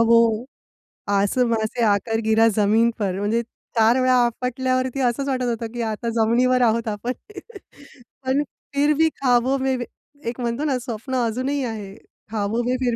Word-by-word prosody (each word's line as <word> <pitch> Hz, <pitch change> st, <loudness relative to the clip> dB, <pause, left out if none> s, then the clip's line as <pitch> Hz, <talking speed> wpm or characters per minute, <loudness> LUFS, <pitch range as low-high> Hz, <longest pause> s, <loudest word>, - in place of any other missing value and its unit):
वो 230 Hz, 0 st, +4 dB, 0.6 s
आसमाँ 220 Hz, +3 st, +2 dB
से 235 Hz, +2 st, -2 dB
आकर 225 Hz, +2 st, +1 dB
गिरा 220 Hz, +1 st, +4 dB
ज़मीन 220 Hz, +2 st, +3 dB
पर, 195 Hz, -3 st, -1 dB
म्हणजे 215 Hz, +3 st, +1 dB, 0.4 s
4 225 Hz, +3 st, +5 dB
वेळा 255 Hz, 0 st, +4 dB
आपटल्यावरती 255 Hz, +2 st, -1 dB
असंच 250 Hz, +2 st, 0 dB
वाटत 260 Hz, -2 st, -1 dB
होतं 230 Hz, -1 st, -2 dB
की 240 Hz, -, -3 dB
आता 230 Hz, +2 st, -3 dB
जमिनीवर 235 Hz, +3 st, +2 dB
आहोत 230 Hz, -1 st, +2 dB
आपण. 220 Hz, +4 st, -2 dB, 1.1 s
पण, 265 Hz, +3 st, +2 dB, 0.3 s
फिर 290 Hz, +2 st, +3 dB
भी 320 Hz, 0 st, +4 dB
ख़्वाबों 260 Hz, -1 st, +1 dB
में 265 Hz, 0 st, 0 dB, 0.5 s
एक 235 Hz, +2 st, -4 dB
म्हणतो 240 Hz, +3 st, -2 dB
ना 275 Hz, -4 st, +1 dB
स्वप्न 245 Hz, +1 st, -5 dB
अजूनही 260 Hz, +5 st, -1 dB
आहे, 210 Hz, -5 st, -5 dB
ख़्वाबों 220 Hz, +2 st, -4 dB
में 250 Hz, +1 st, 0 dB
फिर 245 Hz, -2 st, 0 dB
235 Hz, 155 wpm, -22 LUFS, 220-255 Hz, 1.1 s, 4